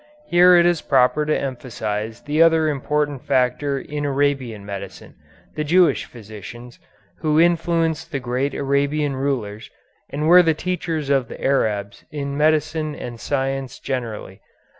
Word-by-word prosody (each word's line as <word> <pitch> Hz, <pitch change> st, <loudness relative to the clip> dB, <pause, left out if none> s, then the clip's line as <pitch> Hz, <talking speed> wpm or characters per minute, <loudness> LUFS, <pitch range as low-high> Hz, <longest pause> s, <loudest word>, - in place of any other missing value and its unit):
Here 180 Hz, -5 st, +6 dB
it 170 Hz, -1 st, +5 dB
is 175 Hz, -2 st, +2 dB
proper 135 Hz, +3 st, +2 dB
to 155 Hz, -, +1 dB
emphasize 115 Hz, -4 st, -4 dB
the 150 Hz, +2 st, 0 dB
other 160 Hz, -1 st, +4 dB
important 145 Hz, -1 st, -1 dB
factor 135 Hz, +1 st, +1 dB
in 145 Hz, +2 st, -5 dB
Arabian 135 Hz, -7 st, -1 dB
medicine, 100 Hz, -1 st, -8 dB, 0.4 s
the 150 Hz, -, -1 dB
Jewish 175 Hz, +3 st, +3 dB
physicians, 115 Hz, -, -11 dB, 0.4 s
who 155 Hz, -1 st, +2 dB
influenced 165 Hz, -1 st, +1 dB
the 140 Hz, -, -2 dB
great 130 Hz, +3 st, -2 dB
Arabian 140 Hz, +1 st, 0 dB
rulers, 125 Hz, -6 st, -3 dB, 0.4 s
and 150 Hz, +2 st, -2 dB
were 180 Hz, +2 st, +8 dB
the 165 Hz, -3 st, +2 dB
teachers 165 Hz, -4 st, -3 dB
of 135 Hz, -3 st, +2 dB
the -, -, -10 dB
Arabs 105 Hz, -7 st, -1 dB
in 140 Hz, -2 st, -4 dB
medicine 155 Hz, 0 st, +1 dB
and 120 Hz, -1 st, -8 dB
science 135 Hz, -1 st, -2 dB
generally. 115 Hz, -7 st, -5 dB
140 Hz, 140 wpm, -21 LUFS, 125-155 Hz, 0.4 s, were